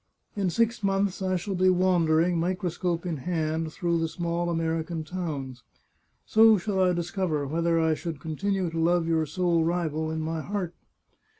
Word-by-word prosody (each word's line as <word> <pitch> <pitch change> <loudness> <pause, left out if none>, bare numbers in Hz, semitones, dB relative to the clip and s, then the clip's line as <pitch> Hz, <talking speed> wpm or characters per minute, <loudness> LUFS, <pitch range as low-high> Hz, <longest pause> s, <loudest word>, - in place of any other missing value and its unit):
In 195 -3 0
six 230 +4 +1
months 195 -1 0
I 185 -1 0
shall 185 +3 -3
be 185 0 +3
wandering, 175 -2 +3
microscope 180 -1 -1
in 170 -3 -2
hand, 160 +1 -2
through 170 -1 0
the 165 - 0
small 170 +1 -2
American 165 0 -2
towns. 150 -7 -5 0.6
So 220 0 +6
shall 195 +1 -2
I 185 -1 +4
discover 175 -3 -1
whether 165 +3 +1
I 160 -1 +3
should 160 -1 -5
continue 180 +4 -2
to 165 - -3
love 170 +1 +2
your 160 -1 +1
sole 170 +1 +1
rival 160 -2 -1
in 160 0 -3
my 160 0 -2
heart. 185 -1 -3
170 Hz, 165 wpm, -27 LUFS, 160-185 Hz, 0.6 s, So